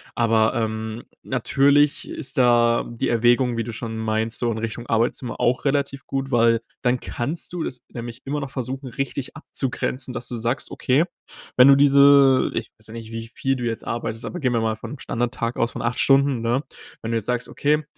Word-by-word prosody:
Aber, 110 -1 +3
ähm, 110 0 -3 0.2
natürlich 140 +3 +2
ist 150 -1 -6
da 120 -2 +4
die 120 -1 -3
Erwägung, 120 +1 +3
wie 115 - 0
du 115 +1 -6
schon 115 0 -5
meinst, 110 +1 -1
so 120 -1 0
in 110 - -3
Richtung 115 +1 -4
Arbeitszimmer 120 +2 -1
auch 125 +4 +1
relativ 140 -1 0
gut, 135 0 -3
weil 115 -1 +4 0.2
dann 125 -1 +2
kannst 140 +10 -3
du 175 - -2
es 125 - -4
nämlich 120 +1 -7
immer 145 +2 -2
noch 135 -1 -6
versuchen, 130 +1 -4
richtig 135 +2 -4
abzugrenzen, 130 -3 -3
dass 125 - -3
du 125 - -4
sagst, 120 +4 -1
okay, 135 +6 +2 0.5
wenn 125 +1 +8
du 140 - +8
diese 140 -1 +6
Ich - - -3
weiß 110 - -7
ja 110 - -11
nicht, 115 -1 -8
wie 115 0 -6
viel 135 0 0
du 125 - -5
jetzt 115 -1 -3
arbeitest. 115 -1 -3
Aber 180 - -5
gehen 130 -5 0
wir 115 - +1
mal 110 -1 0
vom 140 +5 -8
Standardtag 120 -1 -2
aus, 115 +1 +1
von - - -6
8 120 +1 -1
Stunden, 135 -2 +4
ne? 120 +4 0 0.4
Wenn 115 - -5
du 115 - +1
jetzt 110 - -3
sagst, 125 -1 -1
okay, 150 +2 +1
120 Hz, 205 wpm, -23 LUFS, 115-135 Hz, 0.5 s, wenn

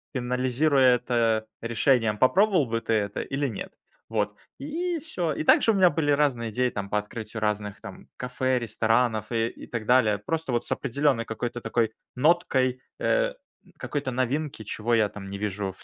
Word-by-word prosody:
анализируя 130 +1 +3
это 115 -3 0
решением, 115 -2 +2
попробовал 185 - +4
бы 115 0 -1
ты 115 - -1
это 100 -2 0
или 140 +1 -2
нет? 110 - -6 0.4
Вот 105 -2 -1 0.2
и 330 +4 -2
всё. 180 - -3
И - - -3
также 225 - +5
у - - +1
меня 185 -3 +5
были 145 -2 0
разные 135 -6 +1
идеи 125 +3 +1
там 100 -3 -5
по 105 - 0
открытию 110 +1 -5
разных 105 -1 -2
там - - -10
кафе, 125 0 0
ресторанов 110 0 0
и 115 -1 +1
и - - -10
так 115 -2 -4
далее. 115 -4 +4
Просто 160 +7 -3
вот 120 -1 0
с - - -9
определенной 135 -3 +1
какой-то 120 +1 -4
такой 115 -1 0 0.2
ноткой, 130 -4 +2 0.2
э, - - +1 0.4
какой-то 140 -3 -3
новинки, 130 +1 -2
чего 110 +3 -2
я 110 -2 +4
там 95 -2 -9
не 100 - -5
вижу 100 -1 -3
в 95 - -17
120 Hz, 175 wpm, -26 LUFS, 110-140 Hz, 0.4 s, также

